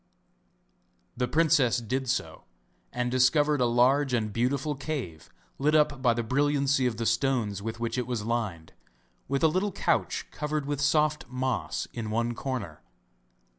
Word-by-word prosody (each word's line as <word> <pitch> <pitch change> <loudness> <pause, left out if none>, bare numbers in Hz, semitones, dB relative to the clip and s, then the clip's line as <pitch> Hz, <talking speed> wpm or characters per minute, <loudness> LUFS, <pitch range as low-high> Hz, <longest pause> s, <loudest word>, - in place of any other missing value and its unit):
The 125 0 -1
princess 150 -5 +3
did 125 +3 -2
so 125 - -3 0.5
and 125 0 -2
discovered 145 +3 +3
a 125 - +4
large 125 +3 +3
and 110 -3 -2
beautiful 135 +6 0
cave 135 - -5 0.3
lit 150 +3 +2
up 150 -3 +2
by 120 -3 +3
the 120 - -1
brilliancy 140 +1 +2
of 115 -3 -3
the 115 - -2
stones 115 -4 0
with 115 +2 -5
which 120 +2 -2
it 125 - -3
was 120 -4 -3
lined, 105 -9 -3 0.5
with 140 +2 -1
a - - +7
little 185 +6 0
couch - - 0
covered 150 -1 -3
with 145 -1 -2
soft 150 +1 +2
moss 125 -9 -2
in 110 -2 -4
one 115 +2 0
corner. 130 -3 -5
130 Hz, 155 wpm, -28 LUFS, 115-145 Hz, 0.5 s, a